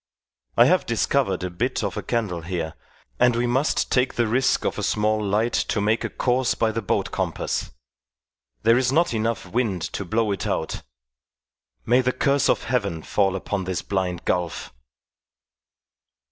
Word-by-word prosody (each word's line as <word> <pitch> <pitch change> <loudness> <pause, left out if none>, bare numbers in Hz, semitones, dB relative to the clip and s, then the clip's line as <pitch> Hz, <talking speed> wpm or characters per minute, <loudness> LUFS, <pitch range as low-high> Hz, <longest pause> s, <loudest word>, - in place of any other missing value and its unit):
I - - +8
have - - +3
discovered 95 -1 +1
a 90 - -3
bit 85 - -1
of - - -2
a - - -3
candle 105 -8 -2
here, 85 -2 -3 0.5
and 125 -1 +4
we 120 +1 +1
must 130 +5 +1
take 130 0 +2
the 120 - +2
risk 125 +4 +1
of - - -1
a - - -2
small 110 0 +1
light 105 +4 +1
to - - 0
make 110 +3 +1
a - - -2
course 125 0 +1
by 110 -1 +1
the 115 +1 -2
boat 100 - -1
compass. - - -2 0.9
There 115 +2 +5
is 130 0 +1
not 165 0 +2
enough 110 -2 -1
wind 100 -3 -1
to - - -3
blow 110 +3 0
it 100 - -2
out 80 - -2 1.0
may 125 +2 +4
the 125 0 0
curse 140 +1 +2
of - - +2
Heaven 100 -11 -1
fall 95 -2 +1
upon 95 0 -3
this 95 -1 -3
blind 90 -3 -2
gulf!" 90 -2 -2
110 Hz, 170 wpm, -24 LUFS, 95-125 Hz, 1.0 s, I